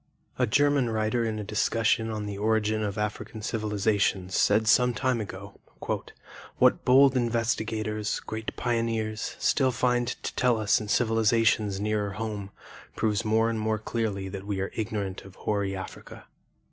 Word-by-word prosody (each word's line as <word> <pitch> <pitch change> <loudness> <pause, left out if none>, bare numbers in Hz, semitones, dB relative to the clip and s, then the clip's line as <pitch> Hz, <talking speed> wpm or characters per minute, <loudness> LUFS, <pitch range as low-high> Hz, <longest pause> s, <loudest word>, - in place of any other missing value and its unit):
A - - +3
German 145 +1 +3
writer 110 +2 0
in 110 -1 -2
a 105 - -4
discussion 110 +2 +1
of 105 -1 -3
the 100 -1 -4
origin 110 +1 +1
of 105 -1 -3
African 105 +1 -4
civilizations 105 -4 0
said 105 +2 +3
some 125 +2 +4
time 130 -2 0
ago 100 0 -9 1.0
"What - - +4
bold 135 +1 +6
investigators, 110 -3 -1
great 110 0 -6
pioneers, 115 -2 -2
still 135 -3 +2
find 125 0 +1
to 125 - -4
tell 125 -2 +2
us 110 0 +2
in 105 - -6
civilizations 110 -2 +2
nearer 105 -1 -1
home, 105 -2 -4 0.5
proves 110 -1 0
more 110 +1 +2
and 115 -1 -1
more 110 0 0
clearly 105 -3 -3
that 100 +1 -7
we 100 -2 -2
are 95 - -2
ignorant 100 -3 -3
of 95 -1 -14
hoary 100 -2 -1
Africa. 95 0 -9
110 Hz, 150 wpm, -27 LUFS, 105-115 Hz, 1.0 s, bold